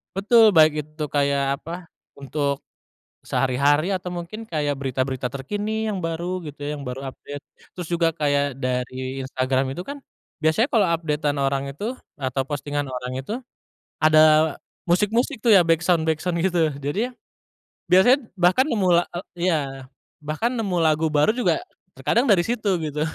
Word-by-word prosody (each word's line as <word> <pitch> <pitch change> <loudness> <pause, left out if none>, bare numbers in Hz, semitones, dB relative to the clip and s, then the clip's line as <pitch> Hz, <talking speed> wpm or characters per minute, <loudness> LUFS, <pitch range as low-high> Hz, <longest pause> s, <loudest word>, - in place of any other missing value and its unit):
Betul 215 +3 +5
baik 155 -4 +6
itu 155 +1 -7
kayak 140 -1 +2 0.2
apa 165 - -9 0.5
untuk, 140 0 -2 0.7
sehari-hari 140 +6 +2
atau 180 -2 -3
mungkin 175 +6 -7
kayak 145 -6 -2
berita-berita 130 -1 -2
terkini 205 - -3
yang 200 - -3
baru 170 +3 -3
gitu 145 -1 -9
ya 150 +1 -3
yang 140 - -8
baru 135 +2 -5
update 145 +2 -10 0.3
terus 175 -3 -6
juga 170 -1 +2
kayak 145 -3 0
dari 130 +1 -3
Instagram 130 0 -1
itu 175 - -5
kan, 280 +9 -7 0.4
biasanya 160 - +2
kalau 215 -5 +3
update-an 150 -3 -1
orang 135 0 0
itu 225 - -5 0.2
atau 135 -3 -2
postingan 145 0 -3
orang 125 -1 -5
itu, 135 - -7 0.7
ada 155 0 +6 0.6
musik-musik 220 - +1
tuh 235 - +2
ya 180 - +6
backsound-backsound 165 0 +1
gitu 170 -4 +2 0.2
jadi, 225 - -2 0.7
biasanya 190 +9 +6 0.2
bahkan 185 +8 +3
nemu 220 -10 0
la - - +3
eee, 175 - -4 0.2
iya 175 -3 +3 0.6
bahkan 155 +10 -2
nemu 200 -5 -1
lagu 160 0 +2
baru 150 +4 +3
juga, 250 +8 0 0.3
terkadang 240 +4 +1
dari 195 -7 +4
situ 220 +1 -2
gitu. 150 -1 -3
160 Hz, 150 wpm, -23 LUFS, 140-190 Hz, 0.7 s, baik